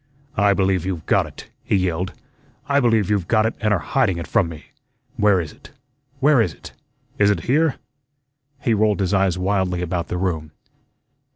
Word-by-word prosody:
"I 100 -1 +4
believe 95 -3 +1
you've 90 -4 -4
got - - +2
it!" - - -13
he - - 0
yelled. 90 -1 -1 0.5
"I 140 -1 +3
believe 115 -6 +2
you've 100 -4 0
got 110 -1 +3
it, 110 - 0
an' 105 -1 +1
are 105 - +4
hiding 105 -5 0
it 85 - -4
from 100 -8 +1
me. 80 -2 -11 0.4
Where 105 -2 +3
is 80 -3 -4
it, - - -17 0.5
where 140 -2 +5
is 90 -10 -1
it? - - -12 0.5
Is 100 0 +5
it 100 -5 +1
here?" 150 - +2 0.8
he 120 -5 +1
rolled 105 -1 +2
his 95 0 0
eyes 95 -2 +2
wildly 90 -2 0
about 85 -1 -2
the 90 - -3
room. 80 -5 -2
95 Hz, 185 wpm, -21 LUFS, 90-110 Hz, 0.8 s, where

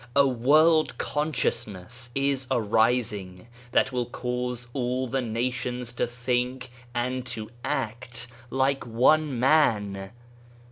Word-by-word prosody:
A 140 0 +6
world 155 +6 +4
consciousness 125 - -2
is 135 -1 +1
arising, 110 -5 +1 0.3
that 135 - +3
will 125 -2 -1
cause 125 0 -3
all 125 -1 -1
the 130 +2 -1
nations 120 +1 -2
to - - 0
think 125 +1 -2 0.2
and 125 +1 -1
to 110 -2 -5
act 120 -1 -3 0.2
like 135 +1 +1
one 130 +4 +3
man. 105 -9 +2
125 Hz, 105 wpm, -26 LUFS, 115-130 Hz, 0.3 s, A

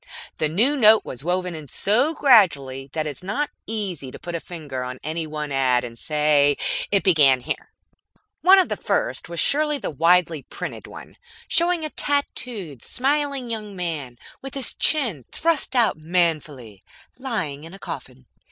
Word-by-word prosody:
The 155 - +1
new 230 - +2
note 220 -4 +6
was 130 +1 -6
woven 180 +1 -1
in 155 -3 -8
so 245 - +1
gradually 145 - +3
that 155 -1 -2
it - - -2
is 140 - -9
not 265 +11 -2 0.2
easy 195 -11 -4
to - - -10
put 175 - -8
a 170 - -2
finger 150 -7 -6
on 125 0 -6
any 160 +1 -3
one 150 -1 -5
ad 130 -2 +2
and 120 -1 -7
say, 150 +1 +2 0.3
"It 200 -1 +1
began 145 -9 +5
here." - - -5 0.7
One 380 +2 +7
of 375 - +3
the - - -2
first - - -1
was 170 -1 -4
surely 300 0 +3
the - - -4
widely 165 0 +3
printed - - -7
one - - -12 0.3
showing 340 -1 +2
a 305 - -5
tattooed, 235 - -2
smiling 275 -2 -1
young 210 -3 -6
man 155 -9 -4 0.2
with 270 0 -8
his 270 -3 -2
chin 230 - +2
thrust 320 -5 0
out 235 -9 +3
manfully, 155 - -1 0.4
lying 180 - -4
in 165 +4 -10
a - - -11
coffin. 130 -7 -8
170 Hz, 170 wpm, -23 LUFS, -, 0.7 s, One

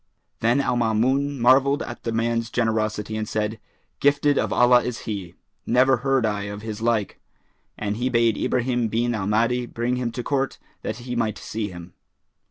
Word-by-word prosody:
Then 120 +4 +2
Al 125 - 0
Maamun 130 +5 +1
marvelled 135 +4 +4
at 120 - -8
the 115 - -1
man's 115 0 0
generosity 110 -2 -1
and 110 -1 -3
said, 110 0 -2 0.4
"Gifted 145 0 +3
of - - -1
Allah 125 0 +5
is 125 -1 -4
he! 95 -6 -5 0.3
Never 130 +2 +4
heard 135 -1 +1
I 105 -1 -1
of 105 +1 -7
his 110 -1 -5
like." 115 -3 0 0.6
And 105 0 -2
he 125 +2 0
bade 115 -3 +3
Ibrahim 120 0 0
bin 120 +2 0
al 100 -3 -2
Mahdi 115 +3 +1
bring 120 +2 -2
him 120 -2 -2
to 125 - -4
court, 135 0 -1 0.2
that - - -3
he 125 -1 -4
might 110 -3 -1
see 110 -1 -4
him. 85 -1 -10
115 Hz, 180 wpm, -24 LUFS, 110-125 Hz, 0.6 s, Allah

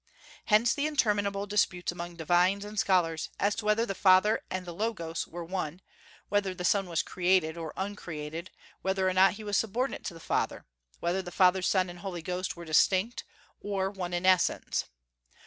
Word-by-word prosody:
Hence 220 +2 +4
interminable 205 -9 +1
disputes 190 -4 0
among 175 0 -7
divines 175 +5 +2
and 210 0 -4
scholars, 170 -5 +1
as 200 +1 +2
to 220 0 -5
whether 215 +2 +3
the 195 - -3
Father 190 +3 +4
and 185 -1 -4
the 175 - -6
Logos 170 -5 -3
were 175 0 -7
one; 175 -2 -4 0.5
whether 200 -2 0
the 180 -1 -4
Son 195 +1 +2
was 170 -1 0
created 180 -3 +1
or 165 -2 -5
uncreated; 170 -4 -5 0.3
whether 190 0 0
or 185 - +1
not 190 +1 +5
he 215 +1 -9
was 205 -1 0
subordinate 235 +5 -1
to 170 - -4
the - - -10
Father; - - -2 0.4
whether 175 +3 0
the 180 - -8
Father, 185 +1 +4
Son, 185 0 +2
and 175 0 -9
Holy 175 -3 -6
Ghost 180 +2 -3
were 170 - -8
distinct, 185 - +2 0.3
or 195 -1 -2
one 185 -3 -5
in 175 +1 -2
essence. 185 -1 +2
185 Hz, 180 wpm, -29 LUFS, 175-205 Hz, 0.5 s, not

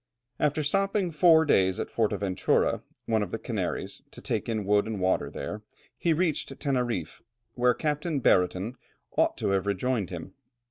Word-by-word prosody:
After 150 +1 +1
stopping 195 +3 +1
four 160 0 +5
days 95 -9 +3
at - - -4
Fortaventura, 100 -4 +1 0.2
one 110 -1 +1
of 105 - -2
the - - -3
Canaries, - - -4
to - - -13
take - - -3
in 110 -3 -1
wood 105 +1 +3
and 110 -3 -3
water 95 0 +1
there, 105 +9 -6 0.3
he 170 - 0
reached 160 -1 0
Teneriffe, 120 - -2 0.3
where 125 -1 +3
Captain 150 0 -1
Brereton 95 0 +2 0.4
ought - - +2
to 105 - -1
have 100 0 +1
rejoined 100 0 0
him. 90 +1 -7
115 Hz, 155 wpm, -27 LUFS, 95-150 Hz, 0.4 s, four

